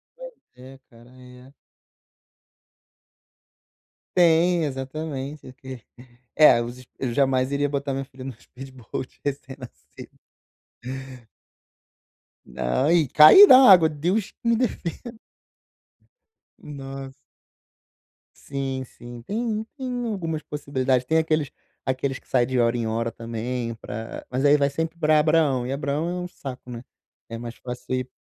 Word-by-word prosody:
Pois - - -10 0.2
é, 130 +2 -13
cara, 120 0 -18
é. 125 +1 -16 2.6
Tem, 170 0 +4
exatamente, 140 +1 -5
o - - -12
que 130 -3 -10 0.5
é, 150 -6 +7
os 120 +2 -7
eu 125 -3 -3
jamais 130 -1 +1
iria 145 +1 +1
botar 140 0 -3
minha 135 0 -3
filha 130 -1 -13
no 135 - -5
speedboat 130 -1 -9
recém-nascido. 130 - -8 2.3
Não, 65 - -1
e 170 -4 +3
caí 155 - +9
da 255 - +9
água, 170 -4 +7
Deus 175 +7 -1
me 235 0 +2
defen 230 -1 -4 1.4
Nossa. 135 -2 -8 1.2
Sim, 135 -1 -4
sim, 120 -1 -12
tem 220 - -3
tem 250 -2 -4
algumas 165 -8 -3
possibilidades. 130 -3 -1
Tem 160 +5 +1
aqueles 155 -2 0 0.4
aqueles 130 0 -2
que - - -32
sai 125 -2 +2
de 130 0 -1
hora 120 0 +2
em 120 -1 -2
hora 115 +1 -1
também 115 +1 -5
pra 110 +1 -8
mas 130 +1 -2
aí 145 +1 +5
vai 140 -1 +2
sempre 160 +4 -4
pra 155 -1 +4
Abraão, 150 -5 +2
e 130 - -4
Abraão 145 +4 -2
é 175 - -3
um - - -5
saco, 130 -7 -9
né, 120 -1 -7 0.5
é 115 - -6
mais 120 0 -8
fácil 125 0 -7
ir 130 0 -3
135 Hz, 130 wpm, -24 LUFS, 125-155 Hz, 2.6 s, caí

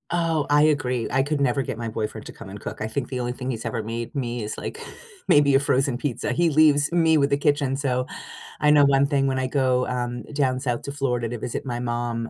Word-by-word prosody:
Oh, 165 -3 0
I 145 0 +5
agree. 130 -6 +1
I 135 +1 +2
could 145 +1 -1
never 135 -1 +1
get 120 - -4
my 115 0 -4
boyfriend 110 0 -4
to - - -9
come - - -11
and 100 +2 -8
cook. - - -7
I 110 - -1
think 120 +3 -3
the 130 - -4
only 120 0 -2
thing 125 +1 -5
he's 115 -2 -5
ever 115 - -2
made 115 +2 -5
me 120 -4 -3
is, 105 - -5
like, - - -6 0.5
maybe 145 -2 +5
a - - +6
frozen 135 -2 +1
pizza. 130 -2 -2
He 170 -1 +2
leaves 150 -1 +4
me 165 -2 +4
with 140 -1 +2
the 140 - +2
kitchen, 145 -2 +1
so, 125 -2 -1 0.6
I 150 - +5
know 145 -1 +6
1 140 0 +4
thing 140 -2 +1
when 135 -1 0
I 130 - -1
go, 130 -2 +1
um, 120 -1 -3
down 130 -3 +1
south 125 -3 -2
to 140 - -5
Florida 125 -4 -1
to 120 0 -5
visit 120 - -4
my 120 -2 -3
mom, 120 -1 -3
130 Hz, 250 wpm, -24 LUFS, 120-145 Hz, 0.6 s, a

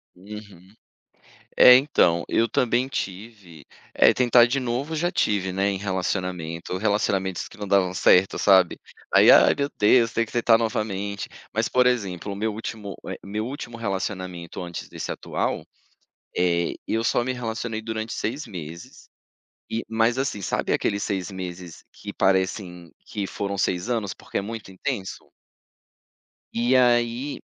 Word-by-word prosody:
Uhum. 100 -1 -12 0.8
É 125 - +10
então, 90 - +3
eu 115 0 +2
também 125 +1 +1
tive, 95 - -7 0.3
eh, - - +6
tentar 120 -1 +5
de 130 +3 -1
novo 130 +5 -2
já 175 +3 0
tive, 100 - 0
né, 95 +2 +1
em 95 - -3
relacionamento, 90 -3 -3
relacionamentos 100 -2 0
que - - -15
não 105 - -6
davam 95 -2 +2
certo, 95 +1 +4
sabe? 95 -3 +4 0.4
"Aí, - - +8
ai - - +7
meu 140 0 -1
Deus, 115 +2 +4
tem 115 0 0
que - - -15
tentar 115 -1 +4
novamente". 105 -3 -3 0.3
Mas 110 0 +1
por 125 0 +3
exemplo 100 -5 -1
o - - -6
meu 110 +2 -1
último, 105 -2 -6
eh, - - -5
meu 105 +3 -3
último 125 -3 -7
relacionamento 95 -5 -4
antes 85 -1 -7
desse - - -6
atual, - - -3 0.7
eh, 85 -1 +1
eu 115 +1 0
só 120 - +1
me 130 - -2
relacionei 115 -2 -4
durante 110 0 -4
6 130 +8 -3
meses. 85 -2 -9 0.6
E 115 - -2
mas 115 +2 +1
assim 130 -6 -2
sabe - - -1
aqueles 100 -1 0
6 95 -3 -2
meses 90 -2 -8
que - - -9
parecem 95 -2 0
que 100 -2 -4
foram 100 0 -4
6 95 +1 0
anos 110 -6 -1
porque - - -6
é - - -2
muito 110 -1 -7
intenso? 95 +1 -5 1.2
E 120 +3 +2
aí, 120 +2 +2
105 Hz, 150 wpm, -24 LUFS, 95-115 Hz, 1.2 s, É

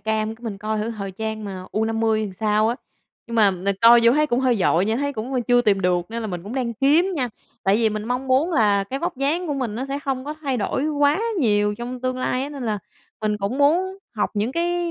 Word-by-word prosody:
cam 220 0 -1
cái 235 - -22
mình 210 -4 -4
coi 215 +1 -2
thử 220 +2 -2
thời 200 -3 -5
trang 220 +1 -4
mà 190 -2 -6
U50 220 0 +1
thì 190 - -8
sao 215 +2 +1
á, 235 - 0 0.5
nhưng 235 - -4
mà 210 -3 +6
mình 190 +2 -2
coi 235 +1 +8
vô 235 - +7
thấy 305 +2 +3
cũng 245 -1 0
hơi 250 -3 +2
vội 175 +1 +3
nha, 220 +2 0
thấy 285 +1 -1
cũng, 245 +3 -5
ưm, 250 -2 0
chưa 245 +1 +3
tìm 205 -4 +2
được 180 -1 +1
nên 230 0 -4
là 220 - -3
mình 175 -2 -5
cũng 210 +6 -7
đang 240 -3 -2
kiếm 310 - +3
nha, 255 -6 -1 0.3
tại 195 +1 +3
vì 225 -1 +3
mình 215 0 -4
mong 250 +3 -2
muốn 290 +7 +2
là 205 -6 +3
cái 265 +7 -4
vóc 345 -1 -3
dáng 305 +7 0
của 295 - -1
mình 245 -6 -3
nó 255 +4 -3
sẽ 275 +1 -3
hông 265 -1 -2
có 300 +1 -4
thay 270 -3 -1
đổi 250 +6 -1
quá 290 +2 +2 0.2
nhiều 210 -5 +2
trong 245 +1 -5
tương 255 0 -2
lai 255 0 -1
á. 280 - -3
Nên 280 -3 -7
là 215 -2 -1 0.4
mình 215 -1 0
cũng 200 +7 -2
muốn 360 +7 +2 0.2
học 210 - 0
những 215 +5 -1
cái 345 0 -1
235 Hz, 265 wpm, -22 LUFS, 210-275 Hz, 0.5 s, coi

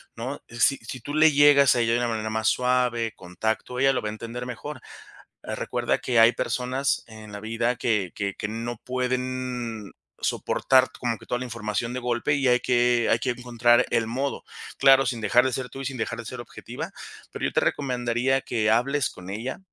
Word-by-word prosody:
¿no? 130 +5 -5
Si 115 +4 +2
si 115 +3 -8
tú 145 - -6
le 155 0 +6
llegas 140 -2 +6
a - - +1
ella 115 0 +2
de 120 - +2
una 120 -1 0
manera 110 -1 -2
más 110 0 +1
suave, 125 -3 +1
con 90 -1 -13
tacto, 110 +3 -2
ella 135 +1 +4
lo - - -1
va 105 - -3
a - - -4
entender 120 +2 -6
mejor. 130 +3 -7 0.6
Ah, - - -4
recuerda - - -1
que 120 -2 +1
hay 115 +1 +8
personas 130 +4 -1
en 110 -2 -12
la 105 - -6
vida 115 +3 -1
que 105 -7 0
que 100 -2 -3
que 105 - -4
no 115 +2 -4
pueden 125 -3 -3 0.3
soportar 130 -1 +2
como 120 -2 -1
que - - -16
toda 125 - -2
la - - -4
información 115 -1 -3
de 130 - -3
golpe, 125 +3 0
y 135 -2 +1
hay 125 0 +4
que 120 -1 +2
hay 115 - +3
que 125 - 0
encontrar 120 -1 +2
el 115 -1 +1
modo. 135 +5 -3 0.3
Claro, 135 0 +6
sin 120 -1 -2
dejar 120 +4 +4
de 130 - +1
ser 125 -1 -3
tú 135 - -8
y - - -5
sin 135 0 -4
dejar 110 - -3
de - - -5
ser 125 +2 -7
objetiva, 120 - -7 0.4
pero - - -7
yo - - 0
te - - +2
recomendaría 125 -1 0
que 110 -4 0
hables 130 +4 +2
con 90 +1 -11
ella, 115 +6 -4
120 Hz, 215 wpm, -25 LUFS, 115-130 Hz, 0.6 s, hay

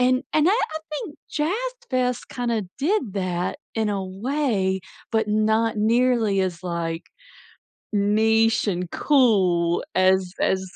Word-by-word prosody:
and 255 +1 +3
and 310 +3 +4
I - - +4
I 315 -8 0
think 305 0 -5
Jazz 300 +3 0 0.4
Fest 250 -1 -1
kinda 235 -3 -1
did 290 - 0
that 180 -2 -2 0.2
in 220 -1 +1
a 195 -2 -2
way, 195 -2 -1 0.3
but 220 -1 +1
not 220 +1 +2
nearly 225 -2 +2
as, 185 -1 -2
like, 170 -1 -3 0.9
niche 220 +2 +2
and 180 -2 -1
cool 190 - +3
as 185 0 +3
as 190 0 +1
215 Hz, 130 wpm, -23 LUFS, 190-250 Hz, 0.9 s, and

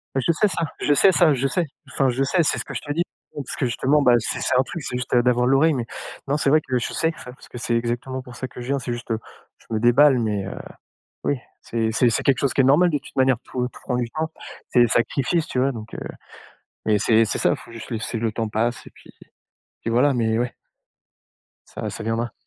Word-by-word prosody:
Mais 135 - +2
je - - +4
sais 190 +6 +2
ça, 165 -4 -1
je 145 - +2
sais 190 +6 +6
ça, 170 -5 +4
je 135 +1 0
sais. 175 +4 0 0.3
Enfin, 135 -2 +2
je 130 +3 0
sais, 170 +5 +2
c'est - - +1
ce - - -5
que - - -8
je - - -4
te 145 - -6
dis, 170 - 0 0.3
parce 140 -3 -5
que 130 - -1
justement, 135 +5 +2
bah, 125 - +6
c'est 115 - -3
c'est 130 - +1
un 130 - +6
truc, 160 +2 -7
c'est 125 - -4
juste, 125 0 -3
heu, 120 - +5
d'avoir 125 0 +3
l'oreille, 140 +4 +4
mais 120 -3 -2 0.4
non, 145 +2 +1
c'est 140 - +1
vrai 155 +1 +5
que 130 -2 -1
je 120 - -3
sais 160 0 +1
ça, 125 - -9
parce - - -17
que - - -9
c'est 120 0 -1
exactement 120 +3 -2
pour 125 -1 -12
ça 130 - -5
que 125 - -10
je 120 - -7
viens, 140 0 0
c'est 120 -1 -4
juste, 120 0 -7
heu, 110 - 0 0.4
je - - -24
me 110 - +1
déballe 125 +3 +5
mais 105 -4 -1
heu, 100 - -6 0.7
oui. 145 - +1 0.2
C'est 115 -1 -1
c'est 120 +1 +4
c'est 110 - -1
quelque 135 -2 +3
chose 140 - +1
qui - - -2
est - - +3
normal 165 +7 +5
de 150 - +1
toute 140 - -14
manière, 130 -2 +3
tout, 125 - -3
heu, 125 - 0
tout - - -14
prend 125 - -1
du 120 -2 -1
temps, 160 +3 -3 0.4
c'est 120 - +4
des 120 - +6
sacrifices, 140 +7 +1
tu 125 - -2
vois? 135 +2 +2
Donc 115 -1 -9
heu, - - -5 0.9
mais 110 -1 +3
c'est 110 +2 +4
c'est 105 - -2
ça, - - +3
faut - - -14
juste 115 - -9
laisser 115 +1 -3
le 110 -1 -1
temps 115 +1 -2
passe 115 +3 -1
et - - -9
puis - - -17 0.7
puis 115 - -2
voilà 130 +4 +3
mais 110 -2 +1
ouais. 120 0 -1 1.2
Ça - - -5
ça 110 - -7
viendra. 115 +2 -1
125 Hz, 265 wpm, -23 LUFS, 115-140 Hz, 1.2 s, sais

